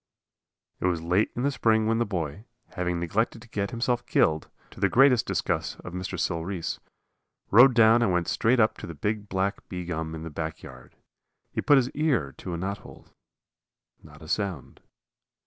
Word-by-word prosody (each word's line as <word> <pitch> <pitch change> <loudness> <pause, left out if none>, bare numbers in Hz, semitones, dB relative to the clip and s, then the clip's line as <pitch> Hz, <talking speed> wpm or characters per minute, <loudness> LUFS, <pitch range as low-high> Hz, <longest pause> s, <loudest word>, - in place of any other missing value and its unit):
It - - 0
was 85 -3 -1
late 90 +5 +2
in 120 - -2
the 140 - +2
spring 110 -4 +2
when 115 +1 +1
the 120 - 0
boy, 90 0 -4 0.3
having 90 -1 -2
neglected 110 +7 -1
to - - -16
get 100 -3 -2
himself 120 0 -1
killed, 80 0 +2 0.2
to - - -13
the 100 0 +2
great 135 +6 +6
disgust - - -2
of 90 - -8
Mr. 90 +1 -4
Sil 85 -2 -1
Reese, 90 -2 -4 0.7
rode 125 +4 +7
down 115 0 +6
and 115 - +2
went 90 -1 0
straight 120 +3 +2
up 110 -1 +2
to - - -7
the 85 - -8
big 105 +6 -3
black 95 +1 -2
bee 90 -1 -5
gum 80 -2 -4
in 80 - -7
the 80 - -7
back 80 +2 -5
yard. 65 -1 -13 0.6
He - - -2
put 145 - +5
his 130 -1 +1
ear 130 - 0
to 90 -2 -5
a - - -4
knothole. 95 +3 -7 0.9
Not 75 0 -15
a - - -11
sound. 90 - -3
95 Hz, 190 wpm, -26 LUFS, 85-115 Hz, 0.9 s, rode